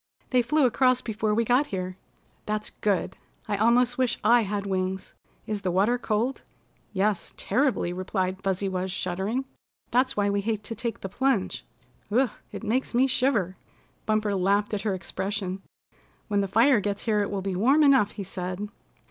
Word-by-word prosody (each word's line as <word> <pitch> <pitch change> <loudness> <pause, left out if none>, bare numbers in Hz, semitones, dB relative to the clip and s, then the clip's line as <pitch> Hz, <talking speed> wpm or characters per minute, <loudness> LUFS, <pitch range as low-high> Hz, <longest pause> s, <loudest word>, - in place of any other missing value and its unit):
"They 250 -1 +5
flew 275 +4 +2
across 255 +1 +3
before 215 -1 -1
we 230 +1 +2
got 250 +5 +3
here." 185 -4 -4 0.5
"That's 215 0 -2
good. 200 -4 -1 0.3
I 210 - 0
almost 245 +3 +3
wish 255 -3 +1
I 240 0 +6
had 200 -1 -2
wings. 190 -1 -2 0.3
Is 210 -2 -3
the 185 - -1
water 205 +7 +2
cold?" 230 +3 -1 0.5
"Yes, 205 0 -1
terribly," 260 -10 +1
replied 185 0 -2
Fuzzy 195 0 -1
Wuzz, 185 0 -2
shuddering. 195 +8 -2 0.5
"That's 260 +1 +2
why 205 -1 +2
we 200 0 +1
hate 215 0 -2
to 225 - -5
take 230 0 -4
the - - -3
plunge. 235 0 0 0.5
Ugh! 250 +3 +3 0.2
It - - -7
makes 235 +3 -1
me 255 +2 +5
shiver!" 235 -9 +1 0.5
Bumper 215 -1 +1
laughed 200 +3 +1
at 205 - -1
her 210 -3 0
expression. 190 0 -3 0.7
"When 205 -1 +2
the 195 - -1
fire 230 +5 +4
gets 205 0 -3
here 215 -2 +2
it 200 - -1
will 195 -2 -3
be 195 -1 -2
warm 270 +11 +4
enough," 265 -8 +5
he 200 - -5
said. 185 +2 -5
210 Hz, 175 wpm, -26 LUFS, 190-240 Hz, 0.7 s, I